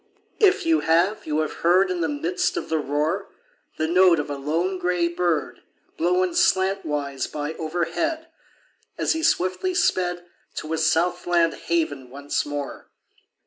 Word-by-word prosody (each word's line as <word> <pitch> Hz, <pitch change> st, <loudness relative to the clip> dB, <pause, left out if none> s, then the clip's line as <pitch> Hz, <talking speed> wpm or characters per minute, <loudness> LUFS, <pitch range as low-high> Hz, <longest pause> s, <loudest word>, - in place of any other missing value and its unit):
If 395 Hz, -3 st, +4 dB
you 325 Hz, -1 st, +3 dB
have, 170 Hz, +6 st, +1 dB
you 155 Hz, 0 st, +1 dB
have 155 Hz, -, -4 dB
heard 185 Hz, +3 st, +4 dB
In 180 Hz, -1 st, -2 dB
the 165 Hz, -, 0 dB
midst 165 Hz, +5 st, -1 dB
of -, -, -4 dB
the 160 Hz, -, +1 dB
roar, 150 Hz, +6 st, -1 dB, 0.5 s
The 155 Hz, -, 0 dB
note 180 Hz, -1 st, +5 dB
of 145 Hz, 0 st, -3 dB
a -, -, -2 dB
lone 165 Hz, +7 st, -1 dB
gray 180 Hz, -1 st, +1 dB
bird, 170 Hz, -2 st, -1 dB, 0.3 s
Blown 180 Hz, +2 st, +1 dB
slantwise 150 Hz, -9 st, 0 dB
by 150 Hz, +1 st, -4 dB
overhead 175 Hz, -, -2 dB, 0.7 s
As -, -, +1 dB
he 320 Hz, -, -3 dB
swiftly 325 Hz, -, +1 dB
sped 180 Hz, -, +1 dB, 0.3 s
To 155 Hz, -, -5 dB
his 160 Hz, 0 st, +1 dB
south 170 Hz, +3 st, 0 dB
land 170 Hz, -1 st, +3 dB
haven 145 Hz, -6 st, -2 dB
once 140 Hz, +3 st, -3 dB
more 145 Hz, -1 st, -5 dB
170 Hz, 150 wpm, -24 LUFS, 155-185 Hz, 0.7 s, note